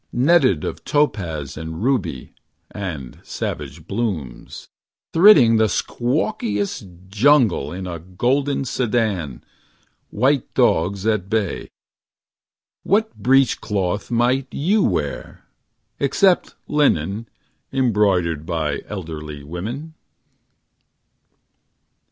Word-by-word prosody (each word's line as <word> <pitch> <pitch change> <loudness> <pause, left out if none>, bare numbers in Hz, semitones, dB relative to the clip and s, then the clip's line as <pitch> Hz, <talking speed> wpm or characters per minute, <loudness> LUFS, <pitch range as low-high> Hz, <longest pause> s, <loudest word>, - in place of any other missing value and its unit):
Netted 130 - +3
of 80 0 -5
topaz 85 - -1
and 80 +3 -6
ruby 95 - -1 0.4
And 80 -11 -6
savage 80 +1 -5
blooms; 95 - -4 0.5
Thridding 160 - +7
the 110 -1 +3
squawkiest 105 - -2
jungle 115 - +3
In 95 +2 -6
a 85 -2 -5
golden 130 - 0
sedan. 105 - -1 0.7
White 135 +1 +1
dogs 95 +5 +2
at 105 -4 0
bay. 110 -4 -1 1.1
What 220 +3 +1
breech 135 -1 +3
cloth 100 -2 -2
might 120 +3 +1
you 200 +9 +1
wear— 75 - -2 0.5
Except 180 +6 +2
linen, 110 - +1 0.4
embroidered 100 - +1
By 80 -2 -2
elderly 75 -7 -7
women 110 - -6
105 Hz, 85 wpm, -21 LUFS, 85-130 Hz, 1.1 s, Thridding